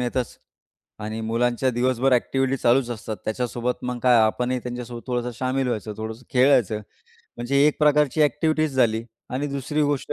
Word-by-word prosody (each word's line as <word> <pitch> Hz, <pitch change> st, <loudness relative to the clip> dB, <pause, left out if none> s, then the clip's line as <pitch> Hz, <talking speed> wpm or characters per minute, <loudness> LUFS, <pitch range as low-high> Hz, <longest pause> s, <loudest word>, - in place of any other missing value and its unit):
येतचं 125 Hz, 0 st, -2 dB, 0.7 s
आणि 110 Hz, +1 st, -4 dB
मुलांच्या 120 Hz, +3 st, 0 dB
दिवसभर 125 Hz, +2 st, +1 dB
ॲक्टिव्हिटी 135 Hz, +2 st, +1 dB
चालूच 120 Hz, 0 st, +2 dB
असतात. 110 Hz, -1 st, -5 dB
त्याच्यासोबत 120 Hz, +2 st, -2 dB
मग 125 Hz, -1 st, -3 dB
काय 125 Hz, -1 st, +5 dB
आपणही 125 Hz, +3 st, +1 dB
त्यांच्यासोबत 120 Hz, -1 st, -7 dB
थोडंसं 125 Hz, -1 st, -2 dB
शामील 130 Hz, +1 st, 0 dB
व्हायचं, 110 Hz, -2 st, -3 dB
थोडंसं 110 Hz, +3 st, -7 dB
खेळायचं. 125 Hz, -5 st, +4 dB, 0.6 s
म्हणजे 120 Hz, +4 st, -1 dB
एक 150 Hz, -, +1 dB
प्रकारची 150 Hz, 0 st, +3 dB
ॲक्टिव्हिटीचं 155 Hz, 0 st, +1 dB
झाली 115 Hz, -3 st, +2 dB, 0.3 s
आणि 135 Hz, +3 st, -2 dB
दुसरी 140 Hz, +2 st, -2 dB
गोष्ट 145 Hz, -2 st, -1 dB
125 Hz, 150 wpm, -23 LUFS, 120-135 Hz, 0.7 s, काय